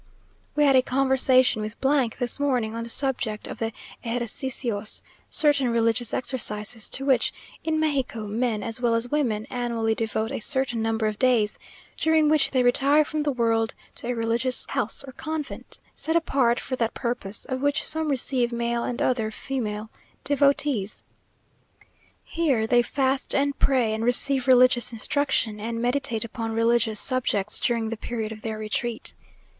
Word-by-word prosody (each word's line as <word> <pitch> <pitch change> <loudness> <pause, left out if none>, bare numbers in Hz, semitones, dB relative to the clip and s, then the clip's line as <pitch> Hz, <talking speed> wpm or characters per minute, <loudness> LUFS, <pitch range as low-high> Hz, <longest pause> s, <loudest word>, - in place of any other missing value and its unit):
We 295 - +3
had 275 -2 +5
a 260 - +6
conversation 260 -2 +3
with 215 +1 -5 0.4
this 245 +1 -1
morning, 250 -6 0
on 230 - -3
the 230 - -7
subject 245 -5 +2
of - - -8
the 225 0 -2 0.3
"ejercicios," 235 -2 -2 0.3
certain 285 -4 +3
religious 230 0 +1
exercises, 225 -4 -1
to 270 - -1
which, 265 -2 +2 0.3
in 315 -1 0
Mexico, 270 -8 -1
men 220 0 -1
as 230 +2 -2
well 235 -2 +2
as 230 +2 0
women 235 -8 0
annually 235 -2 -1
devote 220 0 -2
a - - -3
certain 260 -2 +1
number 225 0 0
of 215 -1 -2
days, 240 -5 +2 0.4
during 315 -1 +3
which 305 -1 +4
they 255 -2 +1
retire 280 +5 +4
from 310 0 -3
the 295 -1 0
world 225 -3 0 0.2
to - - -6
a 245 - 0
religious 230 +2 0
house 225 - -1
or 270 - -9
convent, 310 +2 -5
set 320 - -2
apart 270 -7 +2
for 260 - -4
that 230 -2 -1
purpose, 235 -5 -2
of 260 0 -4
which 285 0 +1
some 315 0 -1
receive 255 -2 +1
male 235 0 -1
and 245 - -2
other 230 -4 0
female 220 -3 -4 0.3
devotees. 280 -7 +1 1.2
Here 280 -10 0
they 240 +2 +4
fast 265 +2 -1
and 280 0 0
pray 250 -5 +2
and 220 +1 -2
receive 260 +2 +1
religious 250 -1 +5
instruction, 230 -2 -1
and 230 +2 -4
meditate 240 -2 0
upon 225 0 -5
religious 230 -1 +2
subjects 210 -6 +1
during 230 -2 0
the 230 - -4
period 220 -1 -4
of 215 -1 -9
their 220 -1 -4
retreat. 220 +2 -2
240 Hz, 160 wpm, -25 LUFS, 225-270 Hz, 1.2 s, a